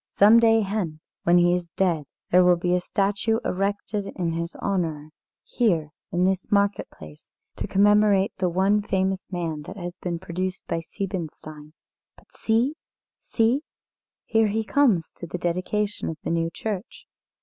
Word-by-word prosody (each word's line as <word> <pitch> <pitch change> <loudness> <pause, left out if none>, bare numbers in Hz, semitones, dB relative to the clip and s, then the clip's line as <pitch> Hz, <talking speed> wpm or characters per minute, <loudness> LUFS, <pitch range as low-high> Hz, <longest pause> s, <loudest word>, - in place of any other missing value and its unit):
Some 215 +3 +6
day 225 -1 +5
hence, 190 -6 -4
when 175 +1 +5
he 175 0 +4
is 175 -1 -2
dead, 170 -4 0 0.3
there 180 +1 +6
will 180 0 +5
be 175 +1 0
a 180 - +3
statue 200 +4 0
erected 200 +1 -2
in 175 -3 -1
his 170 +1 -4
honour 160 -6 -2 0.3
here 170 - 0 0.2
in 180 +1 +2
this 190 0 -1
market 200 0 +1
place, 75 -1 -14 0.3
to - - -3
commemorate 205 0 +4
the 185 -1 +1
one 195 +4 +2
famous 190 -1 -1
man 165 -4 -3
that 195 - -8
has 175 -1 -6
been 175 -2 -3
produced 185 +2 -4
by 165 - -2
Siebenstein. 155 -4 -6 0.4
But - - -22
see 230 +6 +1 0.5
see! 235 +5 +1 0.6
Here 225 -1 +3
he 220 +2 -1
comes 215 - +2
to 170 - -7
the 180 - -4
dedication 185 +4 -2
of 160 - -5
the - - -2
new 165 0 0
church." 205 +3 -6
185 Hz, 160 wpm, -25 LUFS, 170-205 Hz, 0.6 s, Some